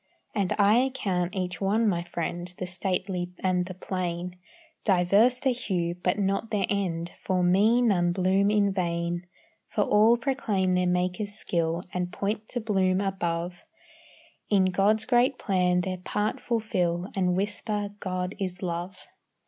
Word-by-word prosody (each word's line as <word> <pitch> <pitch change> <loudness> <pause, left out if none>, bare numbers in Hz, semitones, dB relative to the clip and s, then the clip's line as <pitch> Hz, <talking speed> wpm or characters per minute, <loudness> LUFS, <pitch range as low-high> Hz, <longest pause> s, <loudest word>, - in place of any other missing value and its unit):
And 200 -4 0
I 210 +3 +5
account 195 -9 -1
each 180 -2 -3
one 215 +4 +2
my 175 -4 +1
friend, 175 +1 -4
The 185 - -3
stately 185 -1 -2
and 180 -1 0
the 185 - -7
plain. 180 -1 -3 0.5
Diverse 200 +6 +4
their 265 0 +1
hue, 180 -8 -1
but 180 +2 -1
not 195 +2 0
their 205 -3 +1
end; 175 -4 -1
For 185 -1 -1
me 210 +7 +4
none 175 -6 +3
bloom 190 +2 +2
in 205 -1 +3
vain; 175 -1 -2 0.4
For - - 0
all 220 +3 +5
proclaim 220 -8 0
their 180 0 +2
Maker's 180 +3 -1
skill, 170 -3 -1
And 180 0 -2
point 210 +3 -3
to 245 - -2
bloom 190 -4 +1
above; 175 -3 -2 0.9
In 195 -3 +4
God's 200 +4 +2
great 250 +2 +3
plan 180 -2 +1
their 185 0 -3
part 210 +4 -2
fulfil, 185 -6 -1
And 180 -2 +1
whisper 205 +1 -2
"God 185 -1 -3
is 185 -1 -4
love." 175 +1 -4
185 Hz, 150 wpm, -27 LUFS, 180-210 Hz, 0.9 s, I